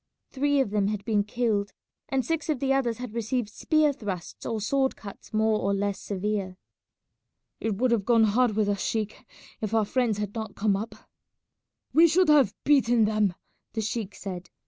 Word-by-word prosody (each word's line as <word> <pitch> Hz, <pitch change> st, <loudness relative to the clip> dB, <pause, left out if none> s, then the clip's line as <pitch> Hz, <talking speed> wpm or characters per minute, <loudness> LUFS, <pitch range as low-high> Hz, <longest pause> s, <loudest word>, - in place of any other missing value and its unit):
Three 285 Hz, +1 st, +1 dB
of 215 Hz, -, -2 dB
them 205 Hz, -2 st, +1 dB
had 205 Hz, -1 st, -3 dB
been 210 Hz, -3 st, +2 dB
killed 210 Hz, -2 st, -1 dB, 0.4 s
and 265 Hz, -3 st, 0 dB
six 325 Hz, +3 st, -2 dB
of 300 Hz, -5 st, 0 dB
the 270 Hz, 0 st, +1 dB
others 240 Hz, -4 st, 0 dB
had 245 Hz, -3 st, -7 dB
received 230 Hz, 0 st, -1 dB
spear 305 Hz, +6 st, +2 dB
thrusts 190 Hz, -8 st, -6 dB
or 225 Hz, -1 st, -2 dB
sword 265 Hz, +5 st, +1 dB
cuts 200 Hz, -2 st, -11 dB
more 215 Hz, 0 st, +2 dB
or 200 Hz, -, 0 dB
less 200 Hz, 0 st, -1 dB
severe. 200 Hz, -1 st, -3 dB, 1.0 s
"It 225 Hz, -2 st, -1 dB
would 250 Hz, +2 st, +2 dB
have 230 Hz, -4 st, +2 dB
gone 230 Hz, +1 st, +4 dB
hard 220 Hz, +1 st, +3 dB
with 215 Hz, -1 st, +2 dB
us, 200 Hz, -1 st, -1 dB
sheik, 220 Hz, +2 st, -3 dB, 0.4 s
if 215 Hz, 0 st, -2 dB
our 220 Hz, -2 st, +3 dB
friends 235 Hz, -2 st, 0 dB
had 210 Hz, -1 st, -3 dB
not 220 Hz, -3 st, -5 dB
come 205 Hz, -1 st, +1 dB
up." 215 Hz, +2 st, -5 dB, 1.0 s
"We 330 Hz, +2 st, +7 dB
should 360 Hz, +2 st, +3 dB
have 275 Hz, -9 st, +5 dB
beaten 245 Hz, -6 st, +4 dB
them," 210 Hz, -4 st, +1 dB, 0.4 s
the 225 Hz, -, -1 dB
sheik 215 Hz, -2 st, -3 dB
said. 185 Hz, -2 st, -7 dB
220 Hz, 185 wpm, -27 LUFS, 205-250 Hz, 1.0 s, We